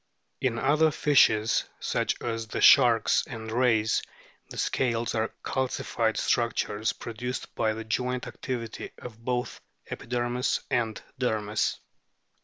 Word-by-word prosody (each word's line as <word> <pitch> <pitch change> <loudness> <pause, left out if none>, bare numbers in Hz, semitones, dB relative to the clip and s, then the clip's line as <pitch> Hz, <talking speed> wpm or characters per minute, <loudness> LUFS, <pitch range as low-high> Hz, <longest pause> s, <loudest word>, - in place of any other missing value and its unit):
In 125 -3 0
other 155 +5 +3
fishes, 125 -7 +3
such - - -1
as 115 -1 -3
the - - -4
sharks 120 -5 +6
and 110 -2 -7
rays, 115 -2 +2 0.5
the - - -9
scales 120 -2 0
are 110 -1 0
calcified 120 -3 -1
structures 110 -2 0
produced 125 +2 -6
by 110 -1 +1
the 115 - -5
joint 125 +3 -2
activity 120 -4 -5
of 115 -2 -11
both 125 0 -2 0.3
epidermis 120 +1 -1
and 110 -3 0 0.2
dermis. 110 -4 0
115 Hz, 115 wpm, -27 LUFS, 110-125 Hz, 0.5 s, sharks